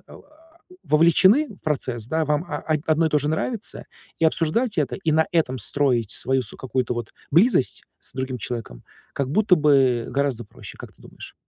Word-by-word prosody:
а - - -12 0.6
вовлечены 190 - +4
в - - -25
процесс, 125 -7 -3
да 160 +2 0
вам 150 +2 0
а 150 - -3 0.3
одно 160 +1 +3
и - - +1
то 150 - +2
же 145 +1 -2
нравится, 210 +8 -3 0.3
и 165 - +1
обсуждать 170 +8 +1
это, 145 -4 0
и 160 -5 -1
на 160 +1 +4
этом 160 -8 0
строить 120 -2 0
свою 130 +1 -1
с 110 - -10
какую-то 130 -1 -2
вот 120 -2 -6 0.2
близость 170 - +3 0.2
с - - -15
другим 130 -1 -3
человеком, 110 - -6 0.3
как 135 -2 -3
будто 205 +3 +4
бы 135 -6 +3
гораздо 135 -3 -1
проще, - - -12
как - - -11
ты - - -30
думаешь? - - -12
145 Hz, 185 wpm, -23 LUFS, 125-160 Hz, 0.6 s, вовлечены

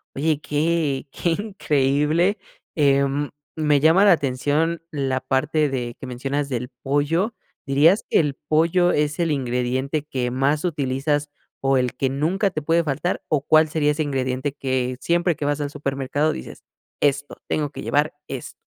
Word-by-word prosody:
Oye, 150 +1 +1
qué 150 -2 0
qué 170 - -1
increíble, 165 -2 +1 0.4
em, 140 -1 +2 0.2
me 150 -2 +2
llama 165 +7 +5
la 200 - +7
atención 150 +3 +1
la 135 -3 -1
parte 145 +3 +1
de 125 -3 -3
que - - -7
mencionas 135 +3 -3
del 125 -2 -3
pollo, 155 - +1 0.3
¿dirías 150 +9 +4
que - - +3
el 145 -4 0
pollo 165 +4 +2
es 150 0 0
el 170 -2 +1
ingrediente 130 +2 -1
que 130 -4 -2
más 135 +4 0
utilizas, 145 -2 -1 0.3
o 135 0 +2
el 125 -1 0
que 135 - +1
nunca 170 +9 0
te 155 - -3
puede 165 +3 +2
faltar, 150 +4 -2
o 150 -3 +2
cuál 155 +1 +5
sería 150 -1 +1
ese 155 +1 -1
ingrediente 130 -1 -2
que 130 -2 -1
siempre 170 +2 +1
que - - -6
vas 145 0 0
al 145 -1 -3
supermercado 140 +1 -1
dices: - - -8 0.4
"Esto, 145 0 0
tengo 150 -2 -1
que - - -8
llevar 150 +2 +1
esto"? 135 -3 -6
145 Hz, 160 wpm, -22 LUFS, 135-160 Hz, 0.4 s, la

